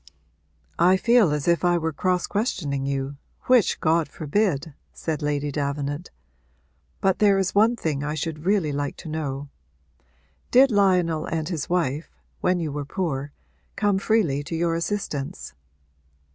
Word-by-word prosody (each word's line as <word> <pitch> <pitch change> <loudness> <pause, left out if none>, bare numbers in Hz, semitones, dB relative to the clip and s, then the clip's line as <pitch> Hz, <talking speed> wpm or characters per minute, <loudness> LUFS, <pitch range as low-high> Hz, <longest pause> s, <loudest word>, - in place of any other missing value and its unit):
'I 180 +3 +5
feel 230 -4 +4
as 150 0 -2
if 170 +1 +3
I 175 -1 +3
were 160 -1 -2
cross 180 +3 0
questioning 150 - -2
you, 140 0 -3 0.3
which 250 -6 +3
God 160 0 +2
forbid!' 155 0 -1 0.2
said 160 -1 -4
Lady 145 -1 -1
Davenant. 145 +3 -3 0.9
'But 190 -1 +2
there 200 -2 +5
is 190 -1 0
one 220 +4 +4
thing 150 -9 -2
I 150 +1 -2
should 155 0 -4
really 195 -7 +2
like 145 0 -3
to - - -10
know. 145 -3 -4 1.0
Did 265 +1 +6
Lionel 180 -6 +2
and 160 -2 -2
his 165 -5 -3
wife, 165 -4 0 0.3
when 180 0 +1
you 160 -3 -2
were 145 0 -3
poor, 145 -2 -3 0.4
come 205 -2 +1
freely 195 -10 +1
to 165 - -4
your 165 0 +1
assistance?' 165 - -3
165 Hz, 145 wpm, -24 LUFS, 145-190 Hz, 1.0 s, Did